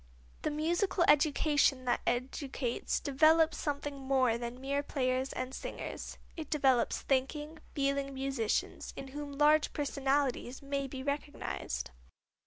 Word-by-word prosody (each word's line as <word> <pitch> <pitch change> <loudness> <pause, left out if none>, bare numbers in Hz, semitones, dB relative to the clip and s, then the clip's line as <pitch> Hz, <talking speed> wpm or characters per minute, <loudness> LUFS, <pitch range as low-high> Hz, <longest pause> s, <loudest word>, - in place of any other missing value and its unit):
The - - 0
musical 345 +5 +1
education 290 -3 +4
that 245 - +1
educates 255 0 -1
develops 315 +3 +4
something 285 -1 -3
more 260 -3 +3
than 235 +1 -5
mere 280 +2 0
players 260 -2 -1
and 255 +1 -4
singers; - - -6 0.2
it 315 -3 -6
develops 265 -5 +2
thinking, 295 +4 -1 0.2
feeling 275 -1 0
musicians, 265 -5 -1
in 270 - -6
whom 290 +1 -6
large 300 +1 +4
personalities 275 -3 0
may 275 0 -2
be 260 0 -6
recognized. 280 - -3
275 Hz, 120 wpm, -32 LUFS, 260-295 Hz, 0.2 s, education